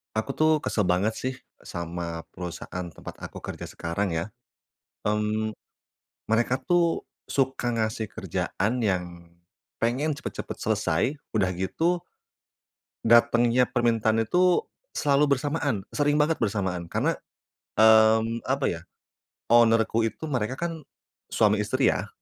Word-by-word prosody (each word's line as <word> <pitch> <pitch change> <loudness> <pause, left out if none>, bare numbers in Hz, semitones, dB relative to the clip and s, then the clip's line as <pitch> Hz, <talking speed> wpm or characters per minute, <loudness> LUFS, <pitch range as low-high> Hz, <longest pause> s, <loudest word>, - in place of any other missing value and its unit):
Aku 110 +5 -1
tuh 155 +1 +3
kesel 105 - 0
banget 95 +5 +2
sih, 130 +1 -2 0.3
sama 85 -1 -5
perusahaan 90 0 -6
tempat - - -9
aku - - -8
kerja - - -6
sekarang 85 +2 -2
ya. 85 +6 -3 0.8
Mmm, 105 +1 0 0.8
mereka 120 +3 +2
tuh 170 +5 +1 0.2
suka 130 -2 0
ngasih 110 -1 -1
kerjaan 105 +5 -2
yang, 95 -5 +1 0.8
pengen 130 +7 +1
cepet-cepet 140 - -6
selesai 125 - 0 0.2
udah 100 -4 +2
gitu 165 - 0 1.0
datengnya 120 +1 +4
permintaan 115 -2 +2
itu, 180 +7 +3 0.3
selalu 140 -1 +3
bersamaan, 145 -7 -2
sering 145 0 +2
banget 150 0 +2
bersamaan. 95 -5 -1
Karena, - - +1 0.6
mmm, 110 +1 +5
apa 135 +1 0
ya 85 - -3 0.7
owner-ku 115 -1 +4
itu 115 - -8
mereka 125 -1 -1
kan 165 +2 -3 0.5
suami 105 -1 +2
istri 130 +6 +2
ya. - - -3
115 Hz, 115 wpm, -26 LUFS, 105-135 Hz, 1.0 s, mmm